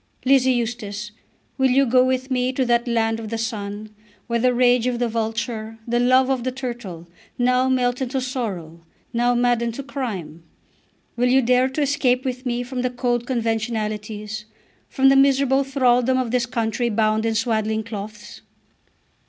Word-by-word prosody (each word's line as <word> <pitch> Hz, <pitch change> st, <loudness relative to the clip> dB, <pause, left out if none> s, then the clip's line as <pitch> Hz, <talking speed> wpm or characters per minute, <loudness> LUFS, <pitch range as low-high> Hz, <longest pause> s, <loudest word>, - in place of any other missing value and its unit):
Lizzie 260 Hz, -1 st, +4 dB
Eustace, 220 Hz, -3 st, -3 dB, 0.5 s
will 265 Hz, 0 st, +4 dB
you 270 Hz, +2 st, +4 dB
go 250 Hz, +1 st, +4 dB
with 260 Hz, +1 st, -1 dB
me, 250 Hz, 0 st, +1 dB
to 260 Hz, 0 st, 0 dB
that 240 Hz, 0 st, +1 dB
land 225 Hz, -1 st, +1 dB
of 220 Hz, -2 st, -6 dB
the 230 Hz, -, -3 dB
sun, 215 Hz, -1 st, -5 dB, 0.3 s
Where 235 Hz, 0 st, -1 dB
the 250 Hz, +2 st, +3 dB
rage 245 Hz, 0 st, +3 dB
of 245 Hz, -1 st, 0 dB
the 240 Hz, 0 st, 0 dB
vulture, 225 Hz, 0 st, -3 dB
the 240 Hz, +1 st, +1 dB
love 255 Hz, +1 st, +4 dB
of 255 Hz, -3 st, -1 dB
the 255 Hz, -, -1 dB
turtle, 235 Hz, -10 st, -6 dB, 0.3 s
Now 250 Hz, +1 st, +2 dB
melt 250 Hz, -1 st, +1 dB
into 265 Hz, +1 st, -1 dB
sorrow, 205 Hz, -11 st, -4 dB, 0.3 s
now 240 Hz, +1 st, +2 dB
madden 240 Hz, -1 st, +1 dB
to 275 Hz, -, -6 dB
crime? 215 Hz, -, -5 dB, 0.7 s
Will 245 Hz, +1 st, +2 dB
you 265 Hz, +1 st, +4 dB
dare 250 Hz, +2 st, +3 dB
to 290 Hz, +3 st, -1 dB
escape 265 Hz, -2 st, +1 dB
with 255 Hz, 0 st, -3 dB
me 245 Hz, 0 st, -1 dB
from 250 Hz, 0 st, -4 dB
the 255 Hz, -, 0 dB
cold 245 Hz, -1 st, -1 dB
conventionalities, 220 Hz, -3 st, -3 dB, 0.4 s
from 270 Hz, -1 st, +4 dB
the 270 Hz, -, +5 dB
miserable 270 Hz, 0 st, +4 dB
thraldom 255 Hz, -2 st, +2 dB
of 255 Hz, -3 st, -1 dB
this 250 Hz, 0 st, +1 dB
country 235 Hz, 0 st, -1 dB
bound 215 Hz, 0 st, +1 dB
in 225 Hz, -1 st, 0 dB
swaddling 220 Hz, -1 st, 0 dB
cloths? 210 Hz, -1 st, -8 dB
245 Hz, 170 wpm, -22 LUFS, 225-255 Hz, 0.7 s, the